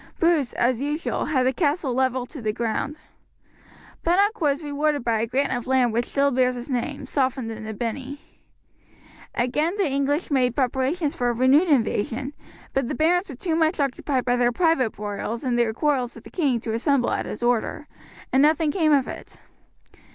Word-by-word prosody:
Bruce, 330 -6 +2
as 245 0 +1
usual, 295 +3 -2
had 260 -4 +1
the 260 - +2
castle 290 -4 0
levelled 260 0 0
to 285 -1 -9
the 215 -1 0
ground. 235 +6 -2 1.1
Bunnock 400 +5 +2
was 290 0 +1
rewarded 290 -1 0
by 230 -2 +1
a 230 - -1
grant 270 +4 0
of 245 0 -5
land 255 -3 +2
which 235 +1 +1
still 280 0 +1
bears 255 0 +2
his 245 +3 -7
name, 270 +3 -2
softened 260 -4 -1
into 220 0 -6
Binney. 260 +6 -4 1.2
Again 300 +10 0
the 400 - +2
English 280 +4 -1
made 250 -3 +2
preparations 275 +4 0
for 245 -1 0
a - - +1
renewed 260 +8 +4
invasion, 250 0 0 0.4
but 270 -3 0
the 295 - -3
barons 350 +6 +2
were 275 - -7
too 325 +5 -2
much 320 0 +1
occupied 270 -1 -1
by 245 0 +2
their 245 0 +3
private 320 -4 +2
broils 210 +3 -4
and 250 -2 0
their 235 -2 +2
quarrels 255 -1 0
with 230 - -12
the - - -13
king 280 -9 +1
to 225 -2 -3
assemble 250 +2 +1
at - - -2
his 210 - -6
order, 240 -2 0 0.5
and 265 - +5
nothing 305 +1 +3
came 315 -2 +2
of 275 -3 +3
it. - - -9
265 Hz, 185 wpm, -24 LUFS, 245-295 Hz, 1.2 s, and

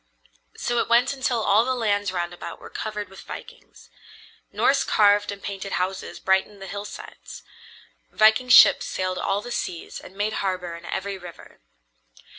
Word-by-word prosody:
So 240 0 -1
it - - -1
went 240 +4 +4
until 255 -4 -1
all 205 +2 +4
the 255 +1 -1
lands 205 -4 0
round 175 -1 -3
about 175 - -8
were - - -12
covered 210 -2 -5
with 195 +1 -13
vikings. - - -12 0.6
Norse 275 0 +2
carved 205 -1 +3
and 200 0 -9
painted 195 0 -5
houses 185 +2 -3
brightened 190 +2 +1
the 195 - -8
hillsides. 200 +2 -9 0.7
Viking 220 +4 +4
ships 245 - +7
sailed 185 0 -2
all 200 +1 -1
the 245 - -8
seas 170 -7 -4
and 190 - -14
made 210 +1 -1
harbor 180 -3 -3
in 170 0 -11
every 195 0 -4
river. 175 -2 -13
200 Hz, 160 wpm, -24 LUFS, 190-220 Hz, 0.7 s, ships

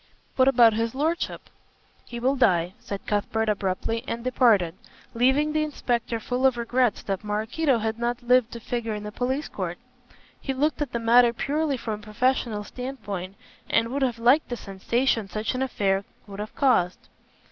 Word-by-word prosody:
"What 260 0 +4
about 240 -4 +6
his 225 +2 -1
lordship?" 320 +5 -2 0.6
"He 240 - -6
will 260 +3 +2
die," 180 -8 +2
said 200 -1 -7
Cuthbert 220 +2 -1
abruptly, 205 +3 -1
and 230 0 -4
departed, 230 -9 +3 0.4
leaving 265 +6 +2
the 310 - +2
inspector 240 -6 -1
full 250 +4 +1
of 255 -2 0
regrets 240 -1 +1
that 195 0 -3
Maraquito 225 +7 0
had 220 0 -2
not 240 +1 -2
lived 245 -1 +3
to 235 - -6
figure 230 -1 -3
in 210 - -6
the 210 - -6
police 260 +6 -2
court. 175 -3 -4 0.6
He 270 - -3
looked 300 +3 0
at 285 -4 -2
the - - -1
matter 235 +1 +5
purely 290 +3 -1
from 220 -3 -4
a - - -16
professional 220 0 0
standpoint, 205 -7 -6 0.3
and 230 0 +2
would 280 +3 -2
have 250 -3 +1
liked 250 +7 +3
the 245 - -3
sensation 225 +3 -1
such 215 +4 -2
an 255 - -3
affair 200 -7 0 0.2
would 200 -1 -10
have 210 +1 -6
caused. 220 -10 +1
235 Hz, 175 wpm, -25 LUFS, 210-260 Hz, 0.6 s, about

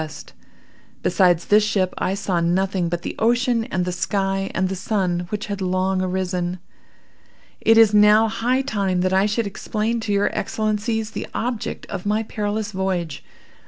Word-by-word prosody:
W. 155 - -4 0.9
Besides 175 -2 +3
this 210 +1 +5
ship, 195 -3 0
I 190 - 0
saw 190 -3 -1
nothing 180 +1 0
but 170 0 -3
the - - -4
ocean 235 0 +2
and 180 -4 -2
the 180 - -2
sky, 195 +1 -1
and 190 0 +1
the 190 - -3
sun, 180 -3 -1
which 210 0 -3
had 200 -3 -5
long 185 0 0
arisen. 180 -1 -2 1.1
"It 225 0 +5
is 225 -2 +6
now 210 +1 +6
high 245 +4 0
time 195 -7 0
that 185 +1 +1
I 190 +2 +3
should 215 +2 -1
explain 215 +3 -2
to 225 -2 -3
your 200 0 +1
Excellencies 215 +1 -1
the - - -5
object 235 -2 -3
of 195 0 -6
my 215 +2 +1
perilous 210 0 -3
voyage. 185 -5 -2
200 Hz, 165 wpm, -22 LUFS, 185-215 Hz, 1.1 s, is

